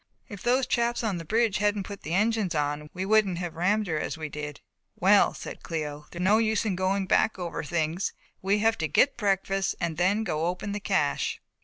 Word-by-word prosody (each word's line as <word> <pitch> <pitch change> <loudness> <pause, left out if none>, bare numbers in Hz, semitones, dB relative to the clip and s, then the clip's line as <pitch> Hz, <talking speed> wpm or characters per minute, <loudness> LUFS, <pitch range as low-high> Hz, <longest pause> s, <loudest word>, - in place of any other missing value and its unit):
"If 205 -3 -9
those 255 +2 +2
chaps 235 -1 0
on 200 -6 -1
the 165 - -8
bridge 220 +3 +2
hadn't 205 -1 +1
put 200 +1 -8
the 165 +3 -3
engines 210 -3 +1
on 150 0 -1
we 185 +1 -4
wouldn't 205 -3 +3
have 175 -2 -4
rammed 200 +6 +1
her 160 -5 -1
as - - -3
we 155 -1 -5
did." 150 -1 -6 0.4
"Well," - - +4
said - - -8
Cléo, 150 -2 -5
"there 170 - -9
is - - -1
no 210 +3 +5
use 220 -1 +1
in 200 -4 0
going 190 +1 0
back 220 +3 +2
over 175 -2 -4
things. 165 +3 -1 0.3
We 195 +2 +2
have 225 +1 +2
to 160 - 0
get 255 - +3
breakfast 195 -2 0
and 165 -2 -2
then 195 +5 +2
go 165 -7 -2
and 165 - +1
open 180 +3 -3
the 205 - -3
cache." 190 - 0
190 Hz, 220 wpm, -27 LUFS, 165-210 Hz, 0.4 s, no